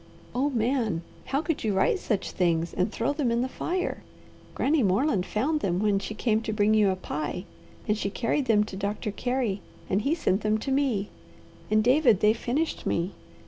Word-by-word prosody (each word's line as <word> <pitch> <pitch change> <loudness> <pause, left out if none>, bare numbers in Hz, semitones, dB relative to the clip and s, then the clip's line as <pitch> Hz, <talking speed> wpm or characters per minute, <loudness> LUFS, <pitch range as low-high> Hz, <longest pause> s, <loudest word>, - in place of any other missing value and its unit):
Oh 270 +4 +1
Man, 230 - 0 0.2
how 275 +3 -1
could 320 -1 -2
you 210 -3 0
write 190 - +2
such 205 - -2
things 170 -2 +1
and 185 +3 0
throw 230 +5 0
them 290 -4 0
in 235 +1 +1
the - - -1
fire? 360 +7 -3 0.5
Granny 295 +1 +2
Moreland 200 0 +2
found 290 +9 0
them 180 -9 0
when 205 0 +2
she 205 +2 -6
came 220 -1 +1
to 225 -1 -3
bring 210 0 +3
you 210 -2 +4
a 190 - +1
pie, 180 0 -4 0.4
and 210 - +2
she 205 -2 -2
carried 255 +6 0
them 210 -4 +4
to 210 - -7
Doctor 205 +2 -2
Carey, 245 -4 -1 0.3
and 195 +2 +2
he 280 +8 +1
sent 220 - +1
them 215 0 +2
to 270 +5 -4
me, 260 -8 +1 0.6
and, 215 0 +3
David, 250 - +4
they 210 +1 +5
finished 270 +8 -2
me. 170 +3 0
220 Hz, 195 wpm, -27 LUFS, 200-265 Hz, 0.6 s, they